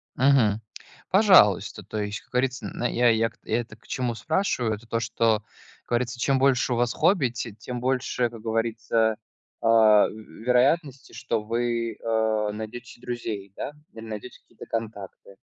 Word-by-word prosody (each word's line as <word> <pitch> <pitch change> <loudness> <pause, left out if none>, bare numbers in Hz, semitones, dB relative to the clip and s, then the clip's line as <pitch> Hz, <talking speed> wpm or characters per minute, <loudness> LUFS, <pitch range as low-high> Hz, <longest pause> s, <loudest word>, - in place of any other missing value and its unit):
Мгм. 125 -6 +3 0.5
Пожалуйста, 180 - +5
то - - -6
есть, 105 0 -4
как - - -29
говорится, 130 0 -1
на 120 - -2
я 120 0 +3
я 115 0 +2
я 120 - 0
это 115 - -12
к 110 - -25
чему 125 -3 -2
спрашиваю, 125 - 0
это 110 +2 -15
то, 115 - -1
что 110 -1 +1 0.4
как - - -33
говорится, 120 +1 -1
чем 135 +2 +2
больше 130 -2 +3
у - - 0
вас 120 0 +1
хобби, 175 -10 +3
те 120 -1 -5
тем 120 +3 -6
больше, 125 -1 0
как 115 -1 -11
говорится, 115 0 0 0.5
э, - - -5
вероятности, 125 +6 +3
что 115 -2 -2
вы, 115 +1 -1
э, 110 -2 0
найдете 110 +3 -7
се 120 - -20
друзей, 110 -6 -5
да, - - -4 0.2
или 115 0 -9
найдете 110 +3 -8
какие-то 115 - -14
контакты. 105 -3 -6
115 Hz, 165 wpm, -25 LUFS, 110-125 Hz, 0.5 s, Пожалуйста